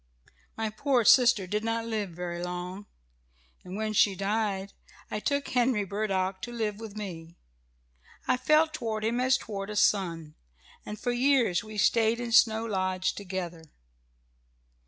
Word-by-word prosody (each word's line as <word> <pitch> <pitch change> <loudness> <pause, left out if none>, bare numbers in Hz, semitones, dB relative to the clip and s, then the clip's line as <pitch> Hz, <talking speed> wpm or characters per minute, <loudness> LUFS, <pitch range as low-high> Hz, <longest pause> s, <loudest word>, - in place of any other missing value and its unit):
"My 220 -1 -2
poor 245 +1 +1
sister 240 -6 +6
did 210 +4 -2
not 225 0 -1
live 215 -4 -2
very 175 0 -5
long, 180 +3 -5 0.8
and 180 +1 -8
when 215 0 -2
she 200 -1 +4
died 200 0 -2 0.4
I 215 - -2
took 280 +4 -1
Henry 245 -4 +1
Burdock 195 -2 -2
to 240 - -6
live 220 -3 -3
with 215 -2 -8
me. 170 -5 -7 0.9
I - - +3
felt 305 +4 +3
toward 220 -2 -3
him 235 +2 0
as 255 0 +3
toward 200 -2 -6
a 210 - -5
son, 170 -7 +1 0.5
and 210 - -6
for 245 - -1
years 240 -7 +2
we 215 -1 -9
stayed 225 +2 +3
in 240 -1 -4
Snow 225 -1 +4
Lodge 185 -3 -1
together. 180 -4 -6
210 Hz, 150 wpm, -28 LUFS, 190-230 Hz, 0.9 s, sister